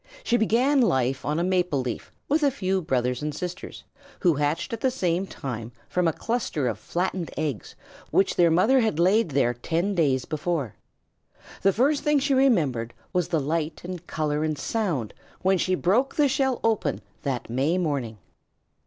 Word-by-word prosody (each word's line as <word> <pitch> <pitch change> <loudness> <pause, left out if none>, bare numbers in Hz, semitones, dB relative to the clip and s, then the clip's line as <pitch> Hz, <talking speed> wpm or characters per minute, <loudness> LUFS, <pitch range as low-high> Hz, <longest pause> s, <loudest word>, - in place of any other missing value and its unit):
She 240 - +1
began 245 +5 +3
life 130 - +1
on 150 +1 -1
a 170 - +1
maple 180 -5 +1
leaf 125 -2 -4 0.2
with 305 +3 +2
a 290 - +4
few 190 -7 -1
brothers 125 -4 0
and 150 -1 -3
sisters, 180 0 -6 0.4
who 175 -3 +4
hatched 150 +7 -1
at 230 - -4
the 260 - +3
same 185 -6 -1
time 115 -7 -6 0.2
from 180 -1 +1
a - - +3
cluster 190 - -2
of 115 - -2
flattened 180 -1 -2
eggs 150 -8 -3 0.3
which 195 - +2
their 175 -1 +5
mother 210 +11 +4
had 220 -10 +1
laid 190 +4 +3
there 130 -4 +2
ten 170 - -1
days 140 -8 +1
before. 155 - -2 0.9
The 195 - +4
first 275 +8 +2
thing 295 0 +3
she 280 0 +1
remembered 150 - +2 0.2
was 180 -2 +1
the 165 -3 +1
light 155 +2 -2
and 180 -1 -7
color 150 -1 -1
and 155 -1 -1
sound 170 - -2 0.3
when 190 0 +3
she 185 +1 +1
broke 220 +10 +1
the 295 -2 +4
shell 265 -2 +1
open 225 -2 0 0.2
that 130 -4 -3
May 135 +9 +1
morning. 140 -10 -2
175 Hz, 175 wpm, -25 LUFS, 145-220 Hz, 0.9 s, their